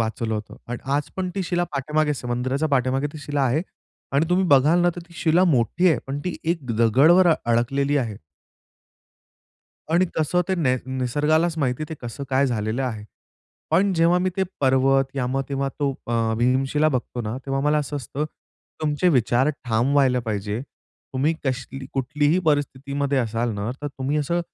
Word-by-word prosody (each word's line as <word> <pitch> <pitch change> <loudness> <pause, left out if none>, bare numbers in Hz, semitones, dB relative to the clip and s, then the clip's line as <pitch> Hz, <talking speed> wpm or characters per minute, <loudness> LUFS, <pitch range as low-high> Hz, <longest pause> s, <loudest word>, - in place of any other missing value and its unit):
वाचवलं 110 0 -1
होतं 105 -2 -6
पण 120 0 -4 0.2
आज 145 +1 -1
पण 185 -1 -1
ती 195 - -1
शिला 175 0 0
पाठीमागेच 150 0 -1
मंदिराच्या 130 +5 -1
पाठीमागे 135 +1 +1
ती 155 - -8
शिला 145 -1 -2
आहे. 135 +6 +2 0.5
आणि 145 +4 +2
तुम्ही 180 +2 +2
बघाल 150 +3 +5
ना, 175 - +4
तर - - -5
ती 170 - -17
शिला 170 +3 +3
मोठी 165 - +3
आहे, 160 - +2
पण 140 +1 -3
ती 180 - -3
एक 165 -2 -1
दगडावर 145 - +5 0.2
अडकलेली 135 +5 +1
आहे. 115 -7 -1 1.7
आणि 175 +3 +3
कसं 160 +3 +1
ते 190 - +2
ने 135 -8 +1
निसर्गालाच 150 +6 +1
माहिती 135 0 0
ते 160 - -5
कसं 125 +4 -6
काय 135 +1 +3
झालेलं 115 0 -1
आहे. 110 -5 -4 0.7
पण 190 +5 +3
जेव्हा 170 +1 +4
मी 185 +1 0
ते 190 - +2 0.2
पर्वत 135 0 +3
या 125 -2 0
मग 135 +2 -1
तेव्हा 135 0 -1
तो 145 -2 +1 0.2
अ, 115 -1 0
भीमशिला 135 +5 +2
बघतो 125 -3 -3
ना 110 +2 -3
तेव्हा 135 0 -1
मला 150 +1 +3
असं 145 0 -3
असतं, 140 +2 -4 0.6
तुमचे 150 +3 +2
विचार 130 -2 +3 0.2
ठाम 120 +3 +1
व्हायला 130 -3 +3
पाहिजे. 105 -1 -3 0.5
तुम्ही 145 +5 +1
कश 130 -2 -1 0.3
कुठलीही 145 +5 +1
परिस्थितीमध्ये 140 -1 0
असाल 115 0 -1
ना, 105 +2 -3
तर 145 - -2
तुम्ही 135 +1 -3
असं 170 +4 0
140 Hz, 170 wpm, -23 LUFS, 125-155 Hz, 1.7 s, बघाल